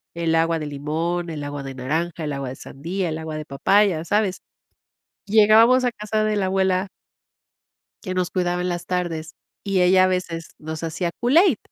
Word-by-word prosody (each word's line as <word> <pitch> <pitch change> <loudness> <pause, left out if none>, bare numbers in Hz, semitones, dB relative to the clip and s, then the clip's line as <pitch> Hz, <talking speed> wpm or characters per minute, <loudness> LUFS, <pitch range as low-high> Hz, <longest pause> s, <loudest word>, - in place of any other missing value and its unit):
El 165 -1 0
agua 165 0 +2
de 155 - -4
limón, 160 +5 -2
el 155 -3 -5
agua 145 0 -5
de 135 -1 -7
naranja, 160 +6 -2
el 150 -1 -2
agua 140 -2 -4
de 130 - -7
sandía, 170 +8 -4
el 155 - -3
agua 160 -1 -6
de 155 - -6
papaya, 175 +4 +2
¿sabes? 205 0 0 0.9
Llegábamos 220 +4 +6
a 245 - +1
casa 215 0 -2
de 215 0 0
la 195 -2 +1
abuela 190 0 +1 1.2
que 185 -2 -4
nos 180 -1 -1
cuidaba 180 -1 -1
en 180 - -1
las 175 -1 -4
tardes. 165 -3 -3 0.3
Y 195 -2 +1
ella 185 +1 +5
a - - +5
veces, 175 -3 -3
nos 155 +1 -6
hacía 170 +2 -2
Kool-Aid. 290 - +4
175 Hz, 185 wpm, -22 LUFS, 160-195 Hz, 1.2 s, Llegábamos